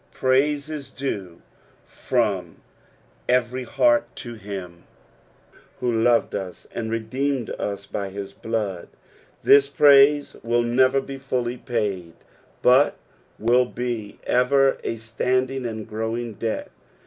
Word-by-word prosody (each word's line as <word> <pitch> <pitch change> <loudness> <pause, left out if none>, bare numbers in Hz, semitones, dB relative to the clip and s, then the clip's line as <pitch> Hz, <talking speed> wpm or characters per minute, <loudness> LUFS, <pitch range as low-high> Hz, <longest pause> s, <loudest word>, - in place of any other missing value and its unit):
Praise 140 +3 +2
is 150 -3 -6
due 95 -10 -5 0.4
from 100 -9 -1 0.7
every 125 +1 +1
heart 295 - +3
to 120 -2 -7
him 95 -5 -8 0.9
who 125 -1 0
loved 115 +1 +2
ns, 95 -3 -6
and 110 -1 -3
redeemed 125 +3 -2
us 100 0 -4
hy 100 -1 -3
his 100 0 -7
blood; 105 -6 -3 0.6
this 140 0 +6
praise 145 0 +5
will 120 +1 +1
never 130 +3 +3
be 135 0 -8
fully 125 -2 -2
piiid. 100 -8 -2 0.5
but 130 +4 +5 0.4
will 120 +3 +3
be 120 -4 -4
ever 135 +2 +3
a - - -2
standing 125 +3 -1
and 110 -2 -6
growing 110 +2 -3
debt. 110 +2 -4
120 Hz, 115 wpm, -23 LUFS, 110-130 Hz, 0.9 s, this